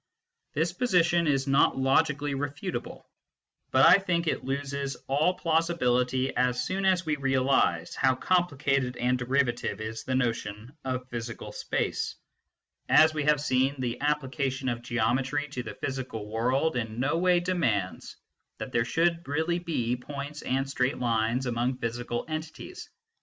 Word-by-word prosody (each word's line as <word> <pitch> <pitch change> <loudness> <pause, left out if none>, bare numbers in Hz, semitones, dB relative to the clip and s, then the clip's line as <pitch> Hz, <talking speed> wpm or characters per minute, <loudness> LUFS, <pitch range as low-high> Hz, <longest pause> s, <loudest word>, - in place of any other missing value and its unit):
This 165 +3 +1
position 175 -6 +2
is 135 -2 +2
not 135 -1 +3
logically 145 +2 +2
refutable, 145 +6 -4 0.7
but - - +5
I - - +8
think 175 -3 0
it 160 - -1
loses 140 0 -3
all 155 +7 +2
plausibility 130 -7 +1
as 125 0 +1
soon 190 +1 -2
as 185 -2 +3
we 155 -1 0
realise 135 - +1
how 130 -1 +2
complicated 140 -6 +1
and 125 +1 +1
derivative 125 -2 0
is 110 +1 -5
the 130 - -1
notion 115 0 -2
of 130 -1 -3
physical 120 -1 -6
space. - - -2 0.7
As 155 0 +6
we 150 -2 -2
have 150 -1 +4
seen, 135 -1 +1
the 120 -1 -3
application 135 -2 -1
of 120 -1 -3
geometry 125 +5 0
to 130 -3 -4
the 115 - -7
physical 130 -5 -4
world 130 +7 +1
in 115 -1 -3
no 145 +6 +1
way 180 0 +4
demands 140 - -1 0.4
that - - -6
there 115 -1 +1
should 170 +4 0
really 160 +4 0
be 125 -9 -1
points 145 +3 -7
and 135 +1 -1
straight 130 +1 0
lines 115 +1 0
among 125 +1 -1
physical 120 0 -3
entities. 155 - -6
135 Hz, 145 wpm, -28 LUFS, 125-155 Hz, 0.7 s, I